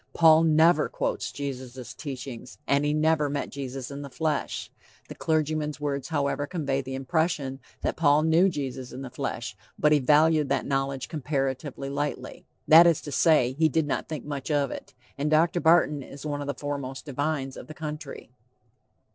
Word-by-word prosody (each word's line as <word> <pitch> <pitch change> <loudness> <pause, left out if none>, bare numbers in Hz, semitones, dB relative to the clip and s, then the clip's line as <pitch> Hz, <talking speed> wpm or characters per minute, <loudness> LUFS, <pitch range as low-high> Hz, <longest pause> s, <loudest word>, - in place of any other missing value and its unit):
Paul 160 -1 +7
never 160 0 +4
quotes - - -2
Jesus' 130 -3 -6
teachings, 130 -3 -7
and 140 +1 +2
he 145 - +1
never 155 -1 +2
met 140 0 -3
Jesus 135 -1 -6
in 140 +1 -6
the 140 - -7
flesh. 155 +3 -2 0.4
The - - -6
clergyman's 155 -1 -1
words, 140 -2 -2
however, 145 -1 -1
convey 140 -6 -1
the 130 0 -6
impression 135 -1 -1 0.2
that - - -2
Paul 150 -1 +4
knew 165 +4 +4
Jesus 135 -5 -5
in 130 +2 -7
the 130 - -8
flesh, - - -4 0.2
but 150 - +3
he 150 - +5
valued 150 +2 +4
that, - - 0
knowledge 135 -1 -1
"comparatively 135 -2 -3
lightly," 145 +1 -4 0.2
that 165 +2 +9
is 165 -3 +3
to 145 - -7
say, 140 -3 +4
he 160 +3 +2
did 160 +2 +1
not 145 - -3
think 155 -5 -5
much 140 -2 -5
of 145 -3 +1
it. - - -9 0.2
And 145 +2 0
Dr. 165 +3 +3
Barton 160 -3 +4
is 140 +2 -10
one 145 -1 -2
of 145 - -5
the 140 - -2
foremost 135 -2 -5
divines 140 -1 -2
of - - -10
the 155 - -10
country. 150 -1 -7
145 Hz, 180 wpm, -26 LUFS, 135-155 Hz, 0.4 s, that